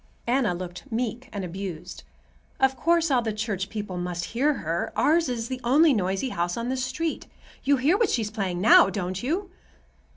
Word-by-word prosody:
Anna 240 -6 +1
looked 180 +8 -8
meek 245 +2 -3
and 200 -3 -4
abused. 180 -1 -6 0.6
"Of 265 0 +3
course 330 +4 +2
all 250 -2 +4
the 225 -2 -2
church 210 -3 -3
people 205 -4 -5
must 175 -1 -3
hear 280 +5 +2
her. 165 -3 -2
Ours 320 -1 +3
is 235 -2 -3
the 255 0 -5
only 290 +5 +5
noisy 195 +3 -1
house 175 -2 -2
on 235 +1 -3
this 260 -1 -1
street. 300 +6 -3 0.4
You 280 0 +3
hear 285 +8 +3
what 460 - +3
she's 220 -4 -1
playing 190 -5 -2
now, 200 -1 +7
don't 185 -1 -3
you?" 355 +9 -2
230 Hz, 185 wpm, -26 LUFS, 185-265 Hz, 0.6 s, now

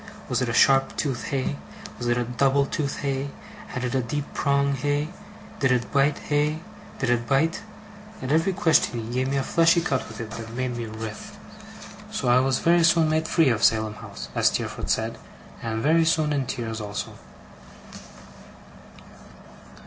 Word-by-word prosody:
Was 125 0 0
it 125 - 0
a - - -1
sharp 135 +2 +4
tooth, 135 -5 -2
hey? 130 - -2 0.4
Was 120 - -3
it 120 0 +2
a 120 - +1
double 135 +4 +2
tooth, 140 0 -3
hey? 140 0 -2 0.4
Had 125 - -5
it 125 - -2
a 130 - +2
deep 140 +5 -3
prong, 140 -1 +1
hey? 145 +3 -1 0.5
Did 130 -3 +2
it 120 -4 0
bite, 140 +1 +3
hey? 150 +1 0 0.4
Did 120 - 0
it 120 -1 0
bite? 155 +6 +1 0.6
At 130 - -4
every 165 +5 +3
question 160 -8 +2
he 115 +1 -6
gave 130 +1 0
me 140 - 0
a 135 - +1
fleshy 165 +4 +4
cut 140 -6 -1
with 110 - -10
it 115 -2 -6
that 115 0 -7
made 130 -1 -2
me 120 -1 -4
writhe; 110 0 -7 0.7
so 130 - -3
I 125 +1 +6
was 130 0 +2
very 170 0 +3
soon 165 -1 +4
made 160 0 +1
free 165 -5 +3
of 115 -2 0
Salem 110 -1 +3
House 65 -10 -9
(as - - +3
Steerforth - - -2
said), - - 0 0.4
and 115 -1 -3
was 110 - -2
very 160 +3 +4
soon 155 -2 +2
in 135 -3 -1
tears 115 -2 -4
also. 105 0 -5
135 Hz, 180 wpm, -25 LUFS, 120-145 Hz, 0.7 s, I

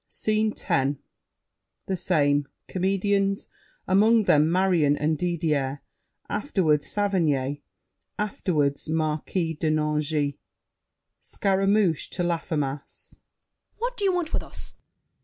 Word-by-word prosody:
SCENE 215 0 0
X 140 +2 +1 0.9
The 190 - -1
same. 145 -5 +2 0.2
Comedians, 195 +1 0 0.4
among 215 +4 +5
them 155 -3 +4
Marion 175 -6 +3
and 155 +2 +1
Didier; 150 -5 -1 0.4
afterward 160 - +1
Saverny, 150 -9 0 0.6
afterward 155 -9 0
Marquis 160 +2 -1
de 155 +1 -1
Nangis 150 -1 0 0.9
SCARAMOUCHE 195 -3 +1
(to 180 - -3
Laffemas). 150 -5 -3 0.6
What - - -2
do 415 - -3
you 390 - +4
want 350 -3 -2
with - - +1
us? - - -1
LAFFEMAS. - - -35
165 Hz, 100 wpm, -25 LUFS, 150-195 Hz, 0.9 s, among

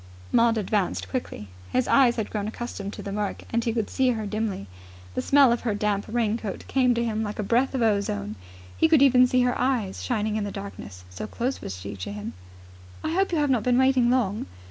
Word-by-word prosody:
Maud 230 -1 +4
advanced 205 -2 -1
quickly. 245 - -4 0.2
His 255 -1 +1
eyes 255 -4 +5
had 220 -3 -3
grown 210 -1 -2
accustomed 215 -3 -5
to - - -8
the 200 - -5
murk, 205 0 -3
and 235 0 +2
he 230 - 0
could 225 -2 -1
see 260 -1 +1
her 220 -3 -1
dimly. 210 - -3 0.5
The 125 - -1
smell 275 - +5
of 235 - 0
her 220 -4 -1
damp 205 -1 0
raincoat 225 -2 -2
came 250 -2 +3
to 235 - 0
him 220 -1 -1
like 210 -1 -4
a 210 - -1
breath 245 +6 +1
of 250 - +1
ozone. 110 - 0 0.4
He - - +4
could 315 -4 +5
even 255 -2 +6
see 250 0 +3
her 245 0 +1
eyes 245 -7 0
shining 215 -3 -1
in 215 - -1
the 205 - -3
darkness, 105 - -8
so 90 - -6
close 255 +3 -3
was 95 - -6
she 100 +2 -7
to 90 - -5
him. 105 +3 -6 0.7
"I 315 - -1
hope 385 +2 +1
you've 300 -4 +2
not 245 -4 +2
been 245 +2 +2
waiting 260 -2 +4
long?" 225 -5 0
225 Hz, 220 wpm, -25 LUFS, 200-250 Hz, 0.7 s, even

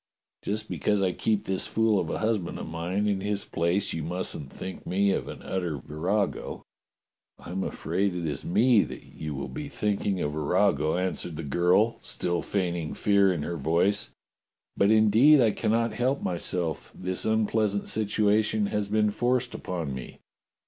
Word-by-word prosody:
Just 105 +1 -3
because 105 -2 0
I 95 - +2
keep 105 +3 0
this 95 -1 -1
fool 110 -2 +2
of 80 - -2
a - - -2
husband 110 -5 -1
of - - -5
mine 90 +5 -2
in 100 -2 0
his 100 0 -1
place, 85 +5 0
you 80 - -3
mustn't 80 -4 -4
think 95 - -8
me 100 +2 +2
an - - -4
utter 90 -5 -2
virago." 90 - -2 0.7
"I - - -10
am 95 +1 -2
afraid 95 0 -1
it 85 -1 -3
is 75 -2 -3
me 110 +5 +4
that - - -8
you 75 -2 -7
will 70 - -4
be 150 -1 -6
thinking 100 -6 -1
a - - 0
virago," 75 +1 +1
answered 90 -2 -2
the 80 - -5
girl, 90 +10 +2
still 85 -1 -2
feigning 85 -5 -2
fear 100 -2 +4
in 85 -5 -2
her 85 +2 -3
voice, 85 +8 +1 0.7
"but 100 - +3
indeed 110 +7 +6
I 115 -4 +4
cannot 115 +2 0
help 125 +5 0
myseK. 85 -1 -2
This 95 0 -2
un 110 0 +2
pleasant 105 -2 0
situation 105 0 +2
has 105 -1 0
been 105 0 +2
forced 120 +3 0
upon 85 -7 -4
me." 65 -1 -8
100 Hz, 170 wpm, -27 LUFS, 85-105 Hz, 0.7 s, indeed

